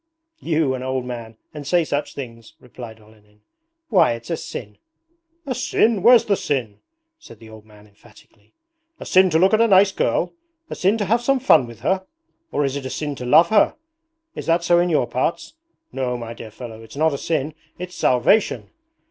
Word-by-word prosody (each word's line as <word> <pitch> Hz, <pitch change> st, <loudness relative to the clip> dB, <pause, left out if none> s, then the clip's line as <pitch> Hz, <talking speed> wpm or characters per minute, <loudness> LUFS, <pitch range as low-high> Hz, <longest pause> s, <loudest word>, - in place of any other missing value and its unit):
'You, 155 Hz, -5 st, 0 dB
an 130 Hz, -, -5 dB
old 130 Hz, -1 st, -3 dB
man 115 Hz, -3 st, -8 dB, 0.2 s
and 145 Hz, -2 st, -8 dB
say 175 Hz, +1 st, +3 dB
such 145 Hz, -1 st, -3 dB
things,' 115 Hz, -4 st, -9 dB
replied 120 Hz, -2 st, -11 dB
Olenin. 105 Hz, -1 st, -23 dB, 0.5 s
'Why, 190 Hz, -, +4 dB
it's 115 Hz, +8 st, -8 dB
a -, -, +1 dB
sin!' 105 Hz, -8 st, -8 dB, 0.7 s
'A 265 Hz, -, -2 dB
sin? 220 Hz, -2 st, +1 dB
Where's 235 Hz, +2 st, +6 dB
the 200 Hz, -, +2 dB
sin?' 120 Hz, -, -3 dB, 0.4 s
said 330 Hz, -, -15 dB
the 110 Hz, -1 st, -15 dB
old 110 Hz, 0 st, -14 dB
man 105 Hz, -1 st, -18 dB
emphatically. 105 Hz, -, -23 dB, 0.4 s
'A -, -, -8 dB
sin 185 Hz, 0 st, +4 dB
to 160 Hz, -, +2 dB
look 190 Hz, +5 st, +3 dB
at 220 Hz, -, +4 dB
a 230 Hz, -, +4 dB
nice 195 Hz, -1 st, +5 dB
girl? -, -, -1 dB, 0.4 s
A -, -, -3 dB
sin 195 Hz, +4 st, +1 dB
to 210 Hz, -, -2 dB
have 230 Hz, +5 st, +1 dB
some 275 Hz, +2 st, +1 dB
fun 160 Hz, -, +4 dB
with 115 Hz, -1 st, -13 dB
her? 190 Hz, 0 st, 0 dB, 0.5 s
Or 145 Hz, -, 0 dB
is 135 Hz, 0 st, -2 dB
it 140 Hz, -2 st, -4 dB
a -, -, -6 dB
sin 150 Hz, +1 st, -4 dB
to 125 Hz, -, -6 dB
love 165 Hz, +7 st, +5 dB
her? 215 Hz, -2 st, +3 dB, 0.6 s
Is -, -, -8 dB
that 170 Hz, +1 st, +2 dB
so 175 Hz, 0 st, +4 dB
in 175 Hz, +1 st, +1 dB
your 150 Hz, -6 st, +2 dB
parts?... 130 Hz, -, -3 dB, 0.4 s
No, 125 Hz, -2 st, -2 dB
my 115 Hz, -1 st, -7 dB
dear 115 Hz, -1 st, -10 dB
fellow, 110 Hz, 0 st, -10 dB
it's 115 Hz, +2 st, -13 dB
not 160 Hz, 0 st, +2 dB
a -, -, -2 dB
sin, 155 Hz, -2 st, -2 dB, 0.2 s
it's 180 Hz, 0 st, -7 dB
salvation! 130 Hz, -, +1 dB
145 Hz, 200 wpm, -21 LUFS, 115-185 Hz, 0.7 s, Where's